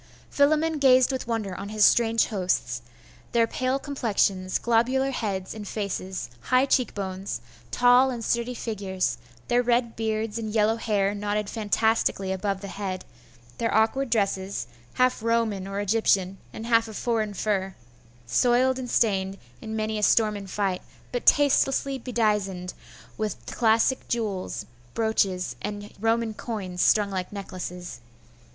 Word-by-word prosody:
Philammon 310 Hz, +2 st, +2 dB
gazed 260 Hz, -1 st, +5 dB
with 260 Hz, -3 st, -4 dB
wonder 220 Hz, -5 st, -2 dB
on 200 Hz, -, -6 dB
his 210 Hz, -1 st, +4 dB
strange 230 Hz, -1 st, +4 dB
hosts, 180 Hz, -, -1 dB, 0.5 s
their 230 Hz, -1 st, +4 dB
pale 255 Hz, +3 st, -1 dB
complexions, 205 Hz, -9 st, 0 dB
globular 255 Hz, +4 st, +2 dB
heads 195 Hz, -7 st, -3 dB
and 215 Hz, -2 st, -7 dB
faces, 190 Hz, -, -4 dB
high 255 Hz, -, +3 dB
cheek 260 Hz, -2 st, +1 dB
bones, 190 Hz, -, -4 dB, 0.3 s
tall 245 Hz, -, +5 dB
and 235 Hz, -3 st, -4 dB
sturdy 235 Hz, +1 st, 0 dB
figures; 190 Hz, -, -2 dB, 0.3 s
their 245 Hz, 0 st, +3 dB
red 240 Hz, -1 st, +1 dB
beards, 220 Hz, 0 st, -2 dB
and 220 Hz, -1 st, -4 dB
yellow 220 Hz, +1 st, +3 dB
hair 205 Hz, -3 st, +1 dB
knotted 205 Hz, 0 st, -2 dB
fantastically 220 Hz, -3 st, +1 dB
above 190 Hz, +1 st, -2 dB
the 200 Hz, -, -6 dB
head; 190 Hz, -2 st, -5 dB, 0.5 s
their 230 Hz, -, 0 dB
awkward 225 Hz, +5 st, +2 dB
dresses, 195 Hz, -, 0 dB, 0.3 s
half 255 Hz, -2 st, +2 dB
Roman 225 Hz, -4 st, 0 dB
or 195 Hz, 0 st, -3 dB
Egyptian, 195 Hz, -2 st, +1 dB
and 220 Hz, -, -7 dB
half 230 Hz, -1 st, +3 dB
of 220 Hz, -, -7 dB
foreign 220 Hz, -4 st, -1 dB
fur, 195 Hz, -1 st, -1 dB, 0.5 s
soiled 250 Hz, -, +3 dB
and 250 Hz, -1 st, -5 dB
stained 195 Hz, -4 st, +1 dB, 0.2 s
in 220 Hz, -, -5 dB
many 215 Hz, 0 st, -1 dB
a -, -, -4 dB
storm 215 Hz, 0 st, +3 dB
and 200 Hz, -1 st, -7 dB
fight, 190 Hz, -2 st, -1 dB, 0.3 s
but 245 Hz, -, -4 dB
tastelessly 275 Hz, -1 st, +3 dB
bedizened 210 Hz, -7 st, -1 dB, 0.5 s
with 215 Hz, -3 st, -2 dB
classic 230 Hz, +2 st, +2 dB
jewels, 200 Hz, -, -2 dB, 0.3 s
brooches, 200 Hz, -5 st, 0 dB
and 205 Hz, 0 st, -6 dB
Roman 225 Hz, +1 st, +1 dB
coins, 195 Hz, -6 st, -4 dB
strung 205 Hz, -2 st, +4 dB
like 185 Hz, -2 st, -3 dB
necklaces. 180 Hz, -5 st, -7 dB
215 Hz, 140 wpm, -26 LUFS, 195-235 Hz, 0.5 s, gazed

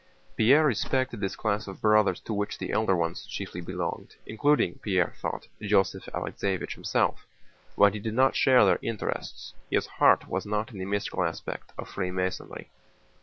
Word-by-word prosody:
Pierre 140 Hz, +8 st, +5 dB
respected 130 Hz, -2 st, 0 dB
this 95 Hz, -2 st, -2 dB
class 105 Hz, -1 st, -1 dB
of 95 Hz, -, -8 dB
Brothers 105 Hz, -4 st, +3 dB
to 110 Hz, -, -5 dB
which 105 Hz, 0 st, -2 dB
the -, -, -4 dB
elder 105 Hz, -3 st, +2 dB
ones 85 Hz, +1 st, -2 dB
chiefly 95 Hz, -3 st, -6 dB
belonged, 85 Hz, -, -5 dB
including, 140 Hz, +4 st, +1 dB
Pierre 95 Hz, -4 st, +1 dB
thought, -, -, -4 dB
Joseph 100 Hz, -2 st, +1 dB
Alexéevich 95 Hz, -2 st, -3 dB
himself, -, -, -1 dB, 0.5 s
but 100 Hz, -1 st, +6 dB
he 105 Hz, -, -4 dB
did 110 Hz, +1 st, -4 dB
not 130 Hz, +2 st, +4 dB
share 130 Hz, -5 st, +6 dB
their 90 Hz, -3 st, +3 dB
interests. 115 Hz, -3 st, -4 dB, 0.2 s
His -, -, +1 dB
heart -, -, +3 dB
was 95 Hz, 0 st, -2 dB
not 105 Hz, +3 st, -2 dB
in 100 Hz, -, -9 dB
the 95 Hz, -, -3 dB
mystical 100 Hz, +1 st, -1 dB
aspect -, -, -5 dB
of -, -, -6 dB
Freemasonry. 95 Hz, -1 st, -4 dB
105 Hz, 165 wpm, -27 LUFS, 95-110 Hz, 0.5 s, but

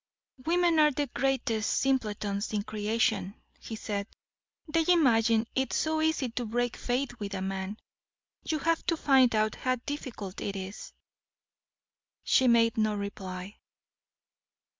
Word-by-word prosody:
"Women 345 Hz, -1 st, +3 dB
are 300 Hz, -1 st, +6 dB
the 290 Hz, 0 st, -1 dB
greatest 240 Hz, -5 st, 0 dB
simpletons 210 Hz, -6 st, 0 dB
in 205 Hz, -1 st, 0 dB
creation," 210 Hz, -2 st, 0 dB, 0.2 s
he 225 Hz, -, -7 dB
said; 205 Hz, -2 st, -3 dB, 0.6 s
"they 325 Hz, +1 st, +2 dB
imagine 230 Hz, -10 st, +4 dB
it 265 Hz, 0 st, -1 dB
so 315 Hz, 0 st, +1 dB
easy 315 Hz, -5 st, +1 dB
to 240 Hz, +1 st, -3 dB
break 245 Hz, +1 st, -1 dB
faith 245 Hz, 0 st, -2 dB
with 200 Hz, -1 st, -4 dB
a 190 Hz, -, -3 dB
man. 190 Hz, +1 st, -4 dB, 0.7 s
You 315 Hz, -, -1 dB
have 330 Hz, +2 st, 0 dB
to 330 Hz, -, +2 dB
find 260 Hz, -6 st, +4 dB
out 215 Hz, 0 st, +2 dB
how 255 Hz, 0 st, 0 dB
difficult 235 Hz, -9 st, -6 dB
it 200 Hz, -, -3 dB
is." 190 Hz, +1 st, -7 dB, 1.3 s
She 260 Hz, -, +4 dB
made 230 Hz, -1 st, +4 dB
no 215 Hz, -1 st, +2 dB
reply. 195 Hz, -1 st, -6 dB
230 Hz, 135 wpm, -29 LUFS, 205-270 Hz, 1.3 s, are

